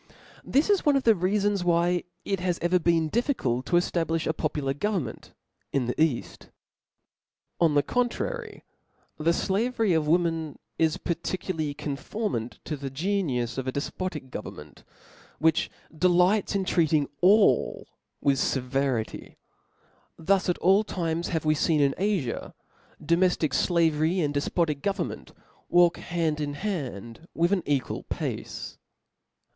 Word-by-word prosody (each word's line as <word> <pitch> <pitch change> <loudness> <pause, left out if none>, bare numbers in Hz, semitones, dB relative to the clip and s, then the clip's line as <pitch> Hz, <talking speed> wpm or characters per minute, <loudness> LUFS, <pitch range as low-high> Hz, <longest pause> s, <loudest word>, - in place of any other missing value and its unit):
Thi^ 285 +3 +2
i« 405 -2 +3
one 290 -3 +4
of 270 - +2
the 225 - +6
reafons 200 +1 +1
why 175 0 +2 0.2
it 195 -2 -1
has 180 -1 -1
ever 175 +2 +2
been 165 -1 +2
difficult 145 - -1
to - - -6
cHablifh 165 -2 +1
a 160 - +1
popular 145 -3 -2
govern 195 +3 -1
ment 110 - -9 0.4
in 135 -3 0
the 120 - -1
caft. 155 -7 -1 1.1
On 160 -3 +3
the 145 - +4
contrary, 415 - -2 0.6
the 160 +2 +3
flavery 220 +3 +1
of 160 -2 +1
women 165 -2 +1 0.2
is 160 -1 +2
per 170 - -1
fcdly 165 -3 -3
conformable 145 - -3
to 155 - -3
the 140 -1 -5
geniuB 135 - -1
of 130 - -4
a - - 0
defpodc 150 -1 -4
go - - -4
vernment, 75 -7 -11 0.5
which 160 0 +2 0.3
delights 180 +5 +3
in 195 -1 0
treating 155 -5 +2 0.2
ail 195 - +4 0.4
with 140 -1 +2
fe 135 - 0
verity. 130 -3 -2 0.8
Thus 190 +3 +1
at 175 - +1
all 195 +4 +4
times 170 -4 -2
have 160 -2 -2
we 155 - +4
feen 155 +1 +1
in 140 -1 +3
Afi* 190 - -1 0.5
•domeftic 170 -3 +2
flavery, 165 0 +2
and 145 -2 0
Klefpotic 145 0 0
government, 200 +3 -3 0.4
walk 175 -1 +5
hand 160 -3 -1
in 145 -1 -3
hand 145 - -5
with 170 +2 +2
an 190 - +2
equal 140 -3 -1
pace. - - -5
165 Hz, 140 wpm, -26 LUFS, 145-185 Hz, 1.1 s, the